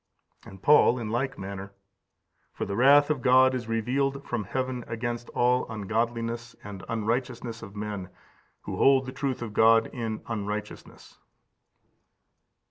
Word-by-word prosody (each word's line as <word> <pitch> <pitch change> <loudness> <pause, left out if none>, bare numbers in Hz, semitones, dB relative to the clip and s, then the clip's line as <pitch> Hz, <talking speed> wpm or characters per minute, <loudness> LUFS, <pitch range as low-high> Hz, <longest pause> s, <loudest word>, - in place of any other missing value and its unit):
xxvi. - - -37
20. - - -13
And 95 - -18
Paul 145 -4 +6
in 115 -3 -4
like 130 +3 -1
manner: 100 0 -7 0.8
"For - - -4
the 100 - -4
wrath 145 +5 +6
of 140 -4 -1
God 130 +1 +5
is 125 -3 -4
revealed 135 +5 -1
from 115 -4 -2
heaven 130 +3 -3
against 120 +1 -4
all 125 0 +2
ungodliness 115 +2 -2
and 100 -2 -8
unrighteousness 115 +1 -2
of 100 -2 -10
men, 105 -3 -5 0.5
who - - -6
hold 135 -1 +4
the 130 - -6
truth 135 -2 -3
of 110 -3 -6
God 115 +1 +4
in 115 -3 -4
unrighteousness." 105 -1 -6
115 Hz, 145 wpm, -27 LUFS, 105-130 Hz, 0.8 s, Paul